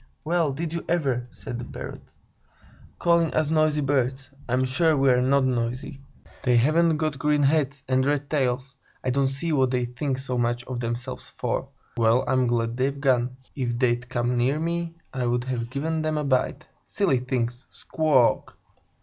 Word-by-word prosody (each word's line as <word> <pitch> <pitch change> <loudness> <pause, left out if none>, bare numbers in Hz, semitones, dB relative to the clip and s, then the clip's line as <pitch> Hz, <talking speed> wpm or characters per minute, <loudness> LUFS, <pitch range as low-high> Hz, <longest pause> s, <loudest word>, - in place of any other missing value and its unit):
"Well, 165 -2 +1
did 160 +4 -4
you 170 - -3
ever!" 135 -8 0
said 120 0 -7
the - - -5
Parrots. - - -9 0.8
"Calling 170 -2 +3
us 155 -1 +1
noisy 155 -1 +3
birds! 135 -1 0 0.2
I'm 130 +2 +2
sure 155 +4 +2
we're 130 -2 +4
not 135 +2 +3
noisy. 125 +2 -2 0.4
They 125 -2 +3
haven't 155 +6 +3
got 155 -3 -2
green 150 0 +2
heads 140 -1 +1
and 130 0 +2
red 145 +1 0
tails; 130 -3 -1 0.3
I 130 - 0
don't 135 +1 +2
see 140 +5 -2
what 130 -3 +3
they 125 -1 0
think 130 +2 -3
so 130 -2 -2
much 120 0 0
of 125 0 -5
themselves 120 +2 -4
for! - - -3 0.3
Well, 115 +2 +4
I'm 130 -1 +2
glad 115 0 0
they've 135 +2 0
gone! 125 -2 +1 0.2
If 120 -3 -2
they'd 120 0 +1
come 120 0 0
near 130 +5 +1
me, 170 0 -2 0.2
I'd 120 -1 0
have 120 -2 -3
given 155 +5 -2
them 155 0 -1
a 150 - -1
bite! 135 +1 0 0.2
Silly 185 -11 +1
things! 125 0 -3
Squawk 145 -7 +2
k - - -17
k!" - - -34
130 Hz, 175 wpm, -25 LUFS, 125-150 Hz, 0.8 s, we're